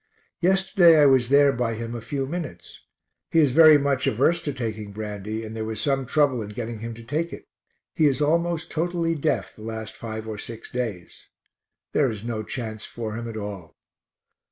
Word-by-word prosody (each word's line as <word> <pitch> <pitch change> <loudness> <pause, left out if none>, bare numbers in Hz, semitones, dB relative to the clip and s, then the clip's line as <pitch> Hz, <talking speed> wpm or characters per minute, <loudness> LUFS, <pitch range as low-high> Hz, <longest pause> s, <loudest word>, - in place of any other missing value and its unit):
Yesterday 185 -2 +5
I 145 - +7
was 130 -3 +4
there 140 0 +5
by 115 -1 -1
him 115 +1 -5
a 120 - -5
few 135 +4 -3
minutes. 140 - -7 0.5
He - - 0
is 145 -4 +4
very 155 +2 +8
much 140 -2 0
averse 140 +9 +2
to 145 - 0
taking 110 -5 -5
brandy, 105 +1 -5
and 110 +1 -7
there 110 - -3
was 110 -1 -4
some 135 0 0
trouble 140 -3 +2
in 105 - -6
getting 115 +1 -5
him 115 +1 -6
to 115 - -11
take 155 +8 -2
it. - - -9 0.5
He 155 - +3
is 140 -1 +1
almost 165 +2 0
totally 170 0 0
deaf 150 - -1
the - - -14
last 110 0 -6
five 110 -1 -6
or 110 -2 -5
six 115 +1 -8
days. 115 -8 -5 0.7
There 140 -3 +3
is 110 -1 -6
no 115 -2 -2
chance 110 -1 -5
for 110 -2 -5
him 115 +1 -5
at 110 - -6
all. 100 -6 -7
120 Hz, 195 wpm, -24 LUFS, 110-150 Hz, 0.7 s, very